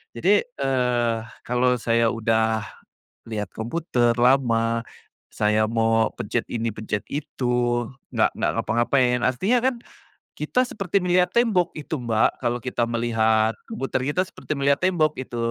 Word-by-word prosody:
Jadi, 195 - +2
eee, 125 - 0 0.3
kalau 125 +1 +2
saya 115 0 +1
udah 110 -1 +1 0.6
lihat 105 -4 -4
komputer 120 -1 0
lama, 115 -2 +2 0.5
saya 105 +1 +2
mau 115 0 +1
pencet - - -3
ini, 115 -1 -1
pencet 105 -1 -3
itu 140 -3 -5 0.7
nggak - - +3
nggak - - +1
ngapa-ngapain, 125 +2 +2
artinya 190 - +2
kan 260 - +2 0.6
kita 255 - +1
seperti 195 -3 -1
melihat 180 0 +3
tembok 210 -8 +2
itu, 155 +1 -4
Mbak, 115 -2 +1
kalau 120 0 0
kita 125 -2 -1
melihat 110 -1 +2
komputer 135 - -3
kita 180 - +1
seperti 155 - -6
melihat 140 0 +2
tembok, 160 -5 +2
itu. 125 -2 -6
120 Hz, 130 wpm, -23 LUFS, 115-150 Hz, 0.7 s, nggak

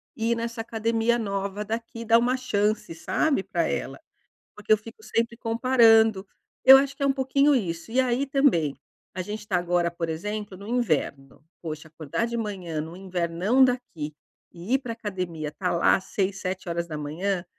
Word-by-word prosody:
ir 230 +1 0
nessa 230 0 -4
academia 230 +1 0
nova 200 0 -3
daqui, 230 +1 -5
dar 230 +1 +6
uma 250 +2 +1
chance, 210 -6 -1
sabe, 290 - 0
pra - - -1
ela. - - -3 0.6
Porque 210 +1 -5
eu - - +4
fico 215 0 -13
sempre 230 +1 -1
comparando. 225 -4 +4 0.4
Eu 265 +1 +11
acho 275 0 0
que 280 - -3
é - - +3
um 270 - +3
pouquinho 275 +2 +3
isso. 175 -2 -3
E 255 - +2
aí 255 +2 0
também, 255 - +2 0.4
a 185 - -3
gente 210 +2 -6
tá 185 - 0
agora, 175 -1 +1
por 170 -1 -4
exemplo, 205 +4 -4
no 200 +2 -10
inverno. 155 - -1 0.2
Poxa, 155 -1 -6
acordar 160 +8 -3
de 235 - -4
manhã 185 -8 -3
no 165 +3 -8
invernão 185 +6 +1
daqui 175 -12 -3 0.4
e 180 +8 -4
ir - - +2
pra 235 -4 -5
academia, 180 -9 -4
tá 180 +4 -2
lá 170 - +4
às 190 - -5
6h, 190 -1 -2 0.2
7h, 170 +3 -2
210 Hz, 170 wpm, -25 LUFS, 175-235 Hz, 0.6 s, Eu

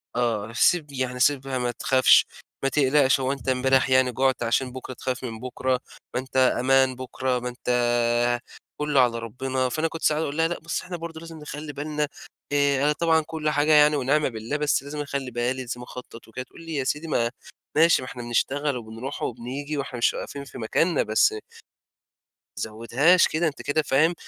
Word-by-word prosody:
آه. 115 -3 -1
سيب 150 +3 +2
يعني 130 -2 -3
سيبها 135 0 +2
ما 125 -1 -1
تخافش، 130 +2 +4 0.4
ما 135 - +2
تقلقش 135 0 +3
هو 130 0 0
أنت 135 -1 -4
امبارح 130 +1 +3
يعني 130 -1 +4
جُعت 130 0 +1
عشان 125 +2 0
بُكرة 130 0 -7
تخاف 130 +1 -4
من 115 -3 -5
بُكرة؟ 130 +1 -1 0.3
ما - - 0
أنت 130 0 -6
أمان 130 0 +3
بُكرة، 130 0 -2
ما 125 0 -4
أنت 125 +1 -12 1.2
كُلّه 150 -2 +1
على 120 -2 +2
ربنا. 130 +3 -2
فأنا 155 +6 0
كنت 165 0 -7
ساعات 155 0 +2
أقول 145 +1 -4
لها: 165 - +3
"لأ 175 - -4
بس 170 - -3
إحنا 180 -1 -6
برضه 165 -1 -7
لازم 165 -1 -10
نخلّي 150 0 -7
بالنا 150 +1 -2 0.4
آآ 140 -1 +2
أنا 150 - +4
طبعًا 160 +1 +2
كل 155 -1 -2
حاجة 150 +1 +2
يعني 150 0 +6
ونعمة 145 +2 +1
بالله 115 +4 -4
بس 150 -2 +1
لازم 145 +1 -5
أخلّي 140 -3 -4
بالي، 120 +2 -1
لازم 125 -1 -6
أخطّط 125 -1 -10
وكده" 115 +3 -6
تقول - - -15
لي: 165 -1 -6
"يا 140 - 0
سيدي 150 +5 -2
ما 120 -6 +1 0.4
ماشي 165 -2 +5
ما 130 - -7
إحنا 125 - -7
بنشتغل 135 +4 0
وبنروح 115 +4 -7
وبنيجي 135 +5 -4
وإحنا 135 -3 -4
مش 120 - +2
واقفين 140 - -6
في - - -11
مكاننا 150 +8 +1
بس" 110 0 +3 1.2
ما - - -4
تزوّدهاش 120 - +3
كده 160 +2 0
أنت 145 - -5
كده 155 +2 +1
فاهم 155 +4 +3
135 Hz, 190 wpm, -25 LUFS, 125-150 Hz, 1.2 s, يعني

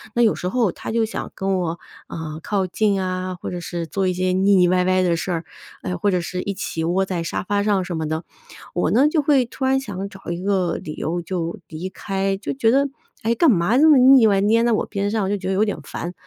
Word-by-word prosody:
那 240 - +4
有 220 - +4
时 180 - -4
候 230 -3 +1
他 - - -7
就 225 -1 +2
想 220 - -6
跟 195 -1 -1
我， 170 -1 -3 0.3
呃， 160 -1 -6
靠 195 +2 -1
近 200 +2 +1
啊， 185 0 -3
或 180 - -7
者 180 - -4
是 175 -1 -4
做 190 +4 -1
一 185 - +1
些 185 0 0
腻 195 +2 +3
腻 180 -1 +5
歪 180 0 +2
歪 185 0 +2
的 175 -2 +2
事 175 +3 -3
儿， 165 -1 -2 0.4
哎， 180 - -2
或 190 +4 0
者 180 -2 +1
是 180 +1 -4
一 200 0 -4
起 165 -4 -4
窝 180 +4 +1
在 180 -3 -3
沙 165 - -3
发 200 +1 0
上 200 -3 +1
什 175 - -4
么 160 -1 -2
的。 160 +2 -3 0.5
我 - - +1
呢， 265 +6 +4
就 305 0 +2
会 280 -3 +3
突 240 - -8
然 265 0 +3
想 200 -6 -5
找 195 -3 -8
一 170 +1 -4
个 190 -3 0
理 150 - -7
由 175 +2 -2
就 170 -1 -4
离 160 +3 -6
开， 195 0 -2
就 200 - -4
觉 235 -4 +2
得， 275 +3 +3 0.4
哎， 230 +2 +1
干 315 +4 +5
嘛 195 +4 +2
这 305 +4 +6
么 295 - +7
腻 255 -1 +7
歪 200 -2 +3
黏 225 +3 +3
在 240 - +2
我 215 - +1
边 200 0 -2
上， 220 -1 0
我 190 - -1
就 205 - 0
觉 190 -1 -6
得 - - +1
有 195 +3 +3
点 205 - -2
烦。 175 +1 -6
190 Hz, 285 characters per minute, -21 LUFS, 180-220 Hz, 0.5 s, 么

